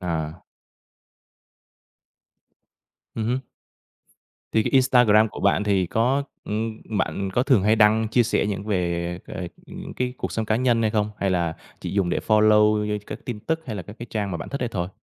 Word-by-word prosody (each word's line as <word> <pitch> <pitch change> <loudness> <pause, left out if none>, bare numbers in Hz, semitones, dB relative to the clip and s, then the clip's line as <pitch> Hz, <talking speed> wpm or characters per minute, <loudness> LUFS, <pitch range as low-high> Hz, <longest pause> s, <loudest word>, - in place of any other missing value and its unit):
À. 80 -2 -3 2.7
Ừm 110 - -2
hứm. 125 +3 0 1.1
Thì 110 - +3
cái - - -2
Instagram 125 -5 +5
của - - -9
bạn 100 +1 +2
thì 100 -3 +2
có, 125 +9 +1 0.2
ừm, 110 +1 -3 0.2
bạn 95 0 -1
có 120 - +2
thường 130 -8 +3
hay 110 +2 +3
đăng 110 +1 +4
chia 120 +2 +3
sẻ 110 - +1
những 100 -1 -3
về, 85 -3 -1
ờ, - - -8
ờ, 90 - -4 0.5
cái 125 0 -2
cuộc - - -4
sống 110 - -1
cá 110 +1 +2
nhân 120 -2 +2
hay 110 - +2
không? 105 -1 0
Hay 100 - 0
là 85 -3 0 0.3
chỉ - - -4
dùng 95 -3 +1
để - - +1
follow 105 -1 +4
như 105 0 -1
các - - -6
tin 120 -4 -5
tức 160 +7 -1
hay 110 -4 -4
là 95 - -5
các 105 +5 -12
cái 120 - -7
trang 105 -3 -2
mà 85 - -2
bạn - - -7
thích 140 -2 -4
ấy 125 - 0
thôi? 90 -5 -3
105 Hz, 195 wpm, -24 LUFS, 95-115 Hz, 2.7 s, Instagram